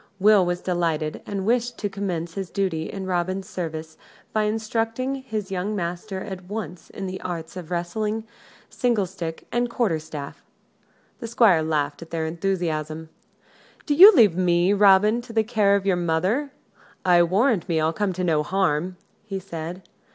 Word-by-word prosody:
Will 205 0 +6
was 175 0 -1
delighted, 165 -4 -1
and 195 -2 -3
wished 240 +1 +1
to 205 - -2
commence 180 -4 -4
his 195 -2 -5
duty 175 -5 -2
in 195 -1 -5
Robin's 185 +1 -2
service 160 -2 -5 0.4
by 215 -1 +2
instructing 225 +4 -1
his 220 -7 -5
young 195 +3 -2
master 185 +2 -4
at 185 -2 -7
once 185 -4 -6
in 195 - -6
the 185 0 -5
arts 170 -2 -5
of 175 -3 -8
wrestling, 210 +6 -2 0.4
single 235 -6 0
stick, 170 -3 -6
and 240 0 0
quarter 220 -9 0
staff. 150 -2 -8 0.8
The 230 - -5
Squire 225 -7 +4
laughed 150 -2 -1
at 165 - -10
their 165 -1 -2
enthusiasm. 160 -3 -2 0.8
"Do 295 - +1
you 375 +8 +11
leave 210 - +6
me, 180 +1 +3
Robin, 205 +3 +5
to 235 -1 -11
the 220 -1 +3
care 210 -3 +3
of 200 -1 -1
your 190 -2 +2
mother: 180 - 0 0.5
I 175 -1 +6
warrant 195 +3 +2
me 165 -2 +2
I'll 160 +1 +1
come 205 0 0
to 180 +1 -3
no 160 -4 +2
harm!" 180 +1 0 0.3
he 195 -2 -5
said. 175 0 -7
185 Hz, 165 wpm, -24 LUFS, 170-215 Hz, 0.8 s, you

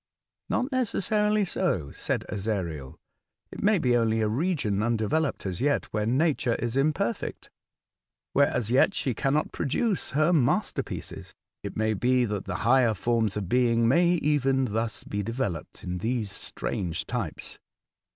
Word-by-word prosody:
'' - - -60
Not 255 +3 0
necessarily 210 -4 +1
so," 135 - -1
said - - -3
Ezariel; 95 -10 -3 0.6
'4t - - -6
may 210 0 +4
be 125 -7 +2
only 115 -1 +2
a 110 - +2
region 115 - 0
undeveloped 115 +7 0
as 90 -2 -3
yet, 145 +1 +1
where 105 0 0
Nature 130 -1 +2
is 120 0 -3
imperfect, 135 -4 -1 0.4
— - - -64
where 140 0 +5
as 115 -1 -2
yet 135 +10 +4
she 130 - 0
cannot 145 +5 0
produce 190 - -1
her 155 +5 +2
masterpieces. 140 -8 -1 0.3
It - - -6
may 110 0 +1
be 125 +4 +2
that 105 -3 -3
the 90 - -4
higher 120 -2 +4
forms 110 0 0
of 100 -3 -3
being 115 +1 +3
may 170 +7 +4
even 135 -5 +2
thus 110 -2 -2
be 105 - -3
de 115 +3 -4
veloped 100 -11 -4
in 90 0 -3
these 115 0 -1
strange 85 -4 -3
types." - - -5
120 Hz, 155 wpm, -27 LUFS, 105-150 Hz, 0.6 s, where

